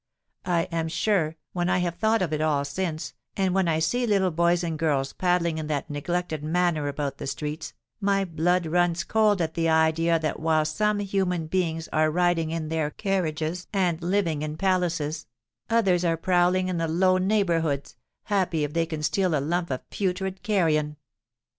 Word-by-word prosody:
I 170 -2 +2
am 165 -1 -1
sure, 165 -1 0 0.2
when 175 0 0
I - - +3
have 175 -2 0
thought 220 +2 +1
of 160 -4 -2
it 155 - -1
all 150 -2 +1
since, 160 +2 -3 0.2
and 190 -2 +1
when 190 -2 +2
I 160 -1 +2
see 240 +10 0
little 195 -4 +2
boys 170 +2 +2
and 165 -2 -3
girls 140 -4 0
paddling 175 -3 +1
in 155 - -4
that 150 -1 -3
neglected 160 +1 -2
manner 160 -2 +1
about 140 -1 -3
the - - -5
streets, 150 +3 -4 0.3
my 195 -1 +1
blood 175 +1 +1
runs 175 +1 +1
cold 210 -3 +2
at 160 0 -3
the 165 -1 0
idea 160 +1 +3
that 155 -1 -2
while 160 -1 +2
some 210 +7 +1
human 190 -4 -1
beings 165 -1 -1
are 155 0 +3
riding 175 -1 +1
in 160 -1 -3
their 160 -2 0
carriages 175 -2 -2
and 180 -4 0
living 170 -4 0
in 155 0 -4
palaces, 175 -5 0 0.4
others 195 -6 +3
are 165 -2 +1
prowling 180 +1 +2
in 180 -2 -2
the 165 - 0
low 185 +3 +3
neighbourhoods, 170 -8 0 0.3
happy 185 -6 0
if 145 0 -3
they 165 0 +1
can 155 -2 -5
steal 185 +1 +1
a - - 0
lump 170 +5 -1
of 130 -2 -4
putrid 190 0 -2
carrion! 155 -7 +1
170 Hz, 180 wpm, -26 LUFS, 155-185 Hz, 0.4 s, I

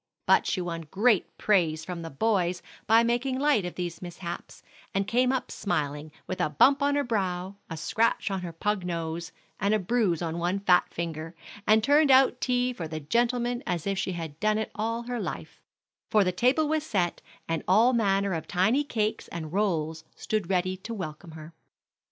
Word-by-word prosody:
But - - +4
she 185 - 0
won 165 -2 -5
great 210 +1 +2
praise 165 -6 +2
from 180 -1 -5
the 165 - -6
boys 180 +2 0 0.2
by 225 +2 +6
making 245 +3 0
light 280 -8 +2
of 180 - -5
these 175 -2 -4
mishaps, 175 -1 -7 0.3
and 195 0 +1
came 250 +2 +2
up 265 - -2
smiling, 150 -5 -2
with 185 - -4
a - - +1
bump 275 - +4
on 285 0 +2
her 285 - +2
brow, 190 -5 -2 0.2
a 160 - -5
scratch 225 +5 0
on 190 -1 -2
her 175 -1 -5
pug 195 +4 -1
nose, 170 0 -4 0.3
and 205 +1 +2
a - - +4
bruise 195 -4 0
on 165 0 -3
one 175 +3 0
fat 180 -3 +3
finger, 165 0 -5 0.3
and 215 0 +5
turned 290 +3 +4
out 260 -1 +5
tea 250 0 +1
for 170 -8 -5
the 155 0 -5
gentlemen 240 - 0
as 175 -3 -2
if 195 -1 -1
she 190 -1 -2
had 165 -3 -6
done 215 +2 +2
it 220 - -3
all 230 +2 -2
her 245 0 -4
life; - - -6 0.5
for 210 -2 +4
the 185 - +1
table 255 - +2
was 310 0 0
set, 180 - -1 0.3
and 165 -1 -1
all 225 +7 +5
manner 200 -4 +2
of 160 - -4
tiny 220 +11 +2
cakes 220 -6 -2
and 160 -2 -7
rolls 165 -6 0
stood 215 -5 -2
ready 185 0 +1
to 225 +5 -7
welcome 160 -2 -7
her. 155 +1 -10
195 Hz, 195 wpm, -27 LUFS, 170-235 Hz, 0.5 s, by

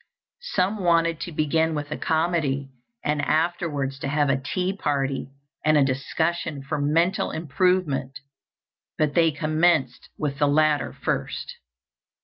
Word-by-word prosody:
Some 195 +3 +1
wanted 165 -1 +3
to 175 - -5
begin 160 +1 +1
with 145 0 -4
a - - -1
comedy, 155 -5 0 0.3
and 150 0 +1
afterwards 150 -3 0
to - - -3
have 145 0 +2
a 135 0 0
tea 185 +7 -2
party 140 -6 -1 0.3
and 155 0 +4
a 140 - +5
discussion 145 +3 -1
for 145 +1 -2
mental 165 +6 +2
improvement, 160 -4 0 0.8
but 150 -2 +1
they 165 -1 +4
commenced 155 -2 +1
with 145 -2 -3
the 145 - +4
latter 150 0 +2
first. - - -3
155 Hz, 130 wpm, -24 LUFS, 140-165 Hz, 0.8 s, a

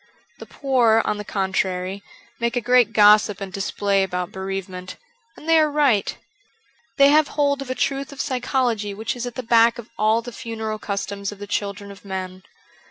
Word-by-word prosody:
The - - -10
poor, 240 -5 +2
on 210 - -1
the - - -4
contrary, 190 -1 -2 0.4
make 235 0 -1
a - - +2
great 245 -1 +3
gossip 210 -1 +5
and 195 -2 -7
display 200 0 0
about 180 -2 -2
bereavement; 190 -1 -6 0.4
and 310 - -13
they 325 -1 +5
are 310 -1 +3
right. 285 -9 +1 0.8
They 280 0 +7
have 305 0 +5
hold 285 -1 0
of 275 - -7
a 255 - -2
truth 275 +1 -2
of 280 - -12
psychology 250 -6 -1
which 220 +4 -3
is 245 0 -4
at 240 - -7
the 255 - -4
back 230 0 +4
of 240 -1 -10
all 220 +2 +2
the 245 - -7
funeral 220 -2 -5
customs 200 -1 -4
of 205 - -10
the 205 - -7
children 200 0 -4
of 200 - -14
men. 185 -1 -6
215 Hz, 185 wpm, -22 LUFS, 195-250 Hz, 0.8 s, They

